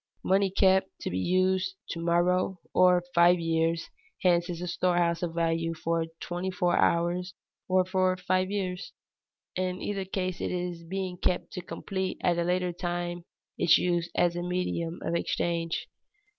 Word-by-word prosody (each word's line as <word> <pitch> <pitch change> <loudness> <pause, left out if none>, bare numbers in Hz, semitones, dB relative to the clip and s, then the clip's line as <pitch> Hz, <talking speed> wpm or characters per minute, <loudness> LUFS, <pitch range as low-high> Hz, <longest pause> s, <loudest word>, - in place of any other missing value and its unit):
Money 195 +1 +3
kept 190 0 +3
to - - -4
be 90 - -1
used 185 - +1
to 165 - -5
morrow 175 +2 +1
or 180 -1 +5
five 175 +1 +6
years 165 0 0 0.3
hence 175 -1 +3
is 170 -2 -4
a 180 - -4
storehouse 175 -1 +1
of 170 -2 -3
value 165 0 0
for 165 0 -1
twenty 175 +2 -3
four 180 -2 +1
hours 175 +2 +1 0.3
or 185 0 +4
for 185 0 +1
five 185 +1 0
years. 190 -3 -3 0.6
In 185 0 -1
either 195 -2 -3
case 185 -1 -3
it - - -1
is 175 -1 -3
being 185 +1 -4
kept 180 - -1
to 180 - -4
complete 190 +1 -4
at 175 -1 +2
a - - +2
later 180 0 0
time 175 -1 -3 0.3
its 170 - +6
use 175 -1 0
as 175 -1 +2
a 175 - -2
medium 175 -1 -2
of 165 - -2
exchange. 170 0 -1
180 Hz, 160 wpm, -28 LUFS, 170-185 Hz, 0.6 s, five